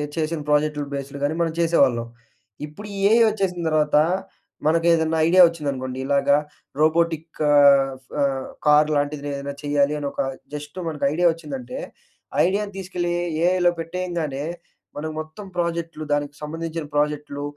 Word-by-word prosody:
చేసిన 160 0 -1
ప్రాజెక్టులు 150 0 +1
బేస్‍లు 140 0 -6
గానీ, 145 +2 0
మనం 165 -1 0
చేసేవాళ్ళం. 135 -8 +3 0.6
ఇప్పుడు 180 +8 -10
ఈ - - -5
ఏఐ 230 +1 +6
వచ్చేసిన 195 -4 -2
తర్వాత 150 -1 +2 0.7
మనకు 165 +1 +2
ఏదన్నా 160 0 +1
ఐడియా 185 +2 +6
వచ్చిందనుకోండి. 140 -6 -4
ఇలాగ 140 0 +1 0.5
రోబోటిక్ 160 0 +1
ఆహ్ 140 -2 +6 0.3
ఆహ్, 135 -1 0 0.2
కార్ 150 0 +5
లాంటిది 145 0 -1
ఏదైనా 140 0 -5
చేయాలి 145 0 +2
అని 145 - -4
ఒక - - -10 0.3
జస్ట్ 150 +2 -7
మనకు 150 -3 -2
ఐడియా 175 +2 +3
వచ్చిందంటే, 135 -6 -7 0.7
ఐడియాను 200 +3 0
తీసుకెళ్ళి 180 -2 -2 0.3
ఏఐలో 180 -1 +3
పెట్టేయంగానే, 165 -4 -3 0.5
మనం 155 +2 -3
మొత్తం 155 +6 -8
ప్రాజెక్ట్‌లు, 170 -2 -2
దానికి 145 0 -1
సంబంధించిన 165 +1 -4
ప్రాజెక్ట్‌లు, 150 -1 -1
155 Hz, 135 wpm, -23 LUFS, 145-170 Hz, 0.7 s, ఏఐ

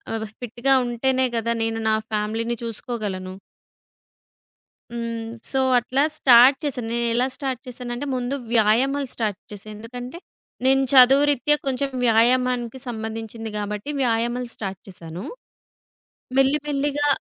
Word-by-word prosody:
అబ్ 220 0 -3 0.2
ఫిట్‌గా 245 +3 0
ఉంటేనే 260 +2 +1
గదా! 230 +1 0
నేను 225 0 -2
నా 215 - +3 0.2
ఫ్యామిలీని 220 +3 -1
చూసుకోగలను. 205 -5 -5 1.6
హ్మ్. 230 -1 -4 0.2
సో, 265 - +1 0.2
అట్లా 255 +3 -1 0.2
స్టార్ట్ 255 +2 +7
చేసాను 250 -5 -2
నేనెలా 235 +2 +1
స్టార్ట్ 265 -3 -3
చేసానంటే 250 +2 -5
ముందు 250 +2 -2 0.2
వ్యాయామాలు 255 +6 +3
స్టార్ట్ 215 -4 -2
చేసా. 205 +1 -8
ఎందుకంటే, 245 +7 -8 0.5
నేను 270 0 +4
చదువురీత్యా 275 +2 +6
కొంచెం 270 +1 0 0.2
వ్యాయామానికి 245 +2 +2
సంబంధించింది 225 0 -5
గాబట్టి 210 +5 -4
వ్యాయామాలు 240 +1 0
స్టార్ట్ 195 -3 -6
చేసాను. 170 0 -8 1.2
మెల్లి 270 +2 +4
మెల్లిగా 290 0 0
240 Hz, 110 wpm, -23 LUFS, 225-265 Hz, 1.6 s, స్టార్ట్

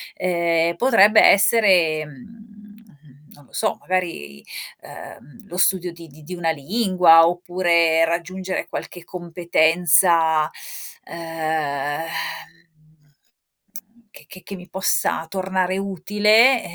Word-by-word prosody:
ehm, 170 -2 0
potrebbe 220 -4 +4
essere, 185 -7 +3
mhmm, 210 - -18
non 145 - -20
lo - - -28
so, - - -1
magari, 165 - -4 0.4
ehm, 200 - -14
lo 180 - -9
studio 180 -1 +1
di 170 0 -14
di 150 +1 -18
di 180 - -9
una 165 -2 -1
lingua, 175 0 +3
oppure 170 -2 +1
raggiungere 185 +3 -4
qualche 175 - -8
competenza 170 -2 +1 0.5
ehm, 155 -3 -4 2.1
che 150 - -16
che 185 +3 -14
che 200 - -9
mi 180 0 -13
possa 190 -3 -1
tornare 190 0 -2
utile, 210 +6 +2
175 Hz, 100 wpm, -20 LUFS, 160-190 Hz, 2.1 s, potrebbe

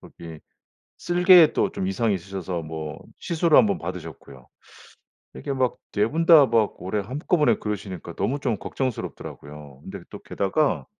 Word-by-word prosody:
저기 80 -2 -12 0.6
쓸개에 175 -2 +5
또 - - +1
좀 95 - -3
이상이 105 +2 0
있으셔서 95 -2 -5
뭐 80 -1 -7 0.2
시술을 170 -1 +2
1 115 - +6
번 100 - -1
받으셨고요. 65 -2 -9 0.9
이렇게 65 - -5
막 130 -2 -1 0.2
4 105 0 +2
분 165 +2 -1
다 155 -5 +8
막 110 -2 0
올해 100 +3 -2
한꺼번에 150 - +1
그러시니까 100 -4 -6
너무 140 - -1
좀 120 -7 -1
걱정스럽더라고요. 75 - -6
근데 95 0 -9
또 - - -9
게다가 120 +10 -1
105 Hz, 320 characters per minute, -24 LUFS, 85-140 Hz, 0.9 s, 다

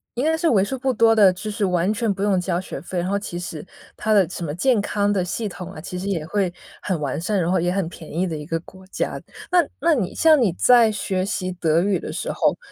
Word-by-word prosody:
应 250 - -1
该 320 0 +2
是 330 0 +2
为 200 -5 +4
数 265 +7 -3
不 260 +1 0
多 225 0 +5
的 200 -4 +6
就 195 +4 -6
是 205 -1 -1
完 180 +1 +1
全 225 -1 0
不 195 0 -3
用 195 -3 +2
交 180 -1 -1
学 185 - -6
费， 180 +1 -4
然 175 - -2
后 200 - +1
其 175 -4 -6
实 175 -2 -6 0.3
它 215 - 0
的 195 -4 +5
什 185 - -6
么 145 -2 -3
健 240 +4 +2
康 205 0 0
的 190 -3 +1
系 215 +5 -3
统 185 -1 -8
啊， 155 - -9
其 180 - -6
实 190 - -5
也 170 -6 -2
会 190 +1 0 0.3
很 185 -5 -2
完 145 -1 -2
善， 195 +4 0
然 170 +1 0
后 185 - +2
也 175 +1 0
很 190 -3 -1
便 165 -2 -11
宜 175 +4 0
的 165 - -3
一 150 -1 -6
个 165 0 -2
国 190 +2 -15
家。 - - -3 0.3
那 355 -1 +5 0.2
那 330 +2 +3
你 200 -9 -1
像 315 -3 +5
你 210 -7 +3
在 240 -3 +6
学 190 -3 -2
习 185 -2 -2
德 165 -1 +1
语 195 -2 +1
的 - - -6
时 - - -3
候， - - +1
190 Hz, 295 characters per minute, -22 LUFS, 175-215 Hz, 0.3 s, 的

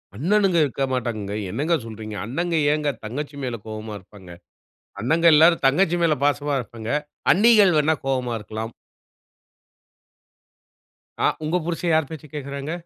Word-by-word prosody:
அண்ணணுங்க 185 - +2
இருக்கமாட்டாங்கங்க. 125 -6 -3 0.2
என்னங்க 145 - -1
சொல்றீங்க? 110 -1 -8
அண்ணங்க 170 +9 -2 0.2
ஏங்க 150 -1 0
தங்கச்சி 145 +6 -5
மேல 125 -2 -3
கோவமா 110 -1 -6
இருப்பாங்க. 95 -1 -15 0.7
அண்ணங்க 160 +9 +1
எல்லாரும் 165 0 +5
தங்கச்சி 170 +5 +3
மேல 160 -2 +3
பாசமா 145 0 +1
இருப்பாங்க. 115 -1 -8 0.4
அண்ணீகள் 205 -3 +5
வேணா 155 +1 +3
கோவமா 130 -2 -1
இருக்கலாம். 110 +2 -6 2.5
ஆ, - - +5 0.2
உங்க 165 +4 +1
புருஷன் 170 0 -1
யார் 155 -3 +2
பேச்ச 155 -1 -8
கேட்குறாங்க? 140 +1 -5
140 Hz, 120 wpm, -23 LUFS, 115-165 Hz, 2.5 s, எல்லாரும்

